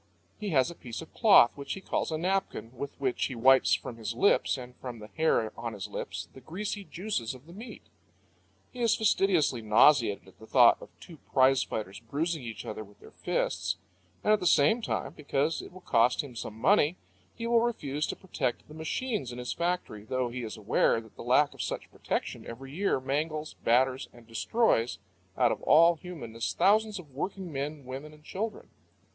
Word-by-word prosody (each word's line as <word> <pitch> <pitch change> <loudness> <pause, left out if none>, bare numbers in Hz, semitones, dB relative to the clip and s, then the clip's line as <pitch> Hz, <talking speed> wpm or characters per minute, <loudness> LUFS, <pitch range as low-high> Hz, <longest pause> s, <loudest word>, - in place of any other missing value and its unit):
He 210 -1 -3
has 145 -1 +3
a - - -7
piece 120 -2 -7
of 160 - -16
cloth 200 - +6
which 140 -1 -5
he - - -6
calls 190 - -2
a 155 - 0
napkin, 180 -8 -2
with 140 +3 -6
which 130 -3 0
he 130 - -4
wipes 130 +3 +5
from 120 - -7
his 115 0 -4
lips, 200 0 +3
and 125 -1 -9
from 125 -2 -7
the 105 -1 -11
hair 135 -9 +1
on 115 -1 -5
his 100 -3 -6
lips, - - -5
the 130 - -13
greasy 200 - -4
juices 175 - -3
of 130 +2 -15
the 170 - -13
meat. 225 +6 -10 0.9
He 250 - -6
is 230 -1 +4
fastidiously 185 - +2
nauseated 110 -1 +4
at 95 - -19
the 110 - -13
thought 120 -1 +6
of - - -11
two 165 - -12
prize 130 0 +5
fighters 100 -3 -4
bruising 155 +7 -2
each 115 -2 -7
other 110 0 -5
with 100 0 -19
their - - -15
fists; 85 - -1 0.5
and 215 - +4
at 215 - +3
the 180 - 0
same 170 +9 +4
time, - - -3
because 150 +1 -1
it - - -11
will 185 +1 -13
cost 120 -5 +3
him 130 -4 -10
some 110 -1 -6
money, 160 - +4 0.4
he 230 - -5
will 235 0 +4
refuse 150 - -1
to - - -3
protect 135 -10 -3
the 150 - -12
machines 160 - -3
in 120 - -8
his 125 0 -3
factory, 170 -12 -2
though 125 +2 -1
he 125 +1 -5
is 110 -2 -6
aware 110 +2 +2
that 110 -2 -15
the - - -10
lack 130 +4 +3
of - - -7
such - - -4
protection - - -3
every 135 +4 -9
year 195 -4 +1
mangles, 150 +3 -2
batters, 130 +3 +2
and 120 -1 -16
destroys 120 - +1 0.4
out - - +4
of - - -3
all 165 +3 +6
humanness 120 -11 -5
thousands 215 +1 +3
of 155 -7 -11
working 185 +5 -4
men, 140 +1 -4
women, 135 +4 -7
and 150 0 -18
children. 210 +7 -5
140 Hz, 200 wpm, -29 LUFS, 120-180 Hz, 0.9 s, cloth